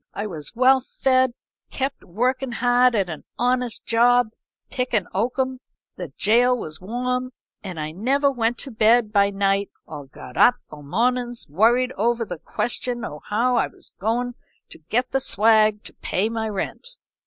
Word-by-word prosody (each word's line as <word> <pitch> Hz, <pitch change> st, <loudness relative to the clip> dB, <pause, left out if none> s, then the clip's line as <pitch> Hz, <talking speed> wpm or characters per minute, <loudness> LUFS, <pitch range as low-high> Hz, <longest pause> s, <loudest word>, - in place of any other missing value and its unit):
I 205 Hz, -, -3 dB
was 165 Hz, -2 st, -6 dB
well 260 Hz, +2 st, +5 dB
fed; 260 Hz, -1 st, +1 dB, 0.3 s
kept 270 Hz, +1 st, -3 dB
workin' 250 Hz, +6 st, -1 dB
hard 245 Hz, 0 st, +3 dB
at 195 Hz, -3 st, +1 dB
an 160 Hz, -3 st, -7 dB
honest 250 Hz, -1 st, 0 dB
job, 240 Hz, 0 st, +4 dB, 0.4 s
pickin' 250 Hz, -7 st, 0 dB
oakum; 255 Hz, +5 st, -1 dB, 0.4 s
the 175 Hz, -6 st, -7 dB
gaol 245 Hz, +4 st, +4 dB
was 155 Hz, -7 st, -6 dB
warm, 250 Hz, +5 st, -3 dB, 0.3 s
and 185 Hz, -5 st, -6 dB
I 155 Hz, 0 st, -4 dB
never 270 Hz, -, +1 dB
went 240 Hz, -2 st, 0 dB
to 270 Hz, -, -8 dB
bed 220 Hz, 0 st, +3 dB
by 200 Hz, -1 st, +4 dB
night 195 Hz, 0 st, 0 dB, 0.2 s
or 145 Hz, -2 st, -9 dB
got 125 Hz, -1 st, -12 dB
up 245 Hz, -, +6 dB, 0.2 s
o' 150 Hz, -1 st, -10 dB
mornin's 240 Hz, -, -1 dB
worried 235 Hz, -, +3 dB
over 230 Hz, +2 st, +1 dB
the 175 Hz, -5 st, -6 dB
question 240 Hz, +4 st, -2 dB
o' 150 Hz, 0 st, -8 dB
how 240 Hz, +4 st, +1 dB
I -, -, +2 dB
was -, -, -13 dB
goin' 240 Hz, +4 st, -1 dB, 0.4 s
to -, -, -10 dB
get 250 Hz, +3 st, 0 dB
the 270 Hz, -, +1 dB
swag 215 Hz, -2 st, +3 dB
to -, -, -7 dB
pay 200 Hz, +4 st, -1 dB
my 225 Hz, -1 st, -3 dB
rent. 205 Hz, -, -4 dB
235 Hz, 165 wpm, -23 LUFS, 200-250 Hz, 0.4 s, up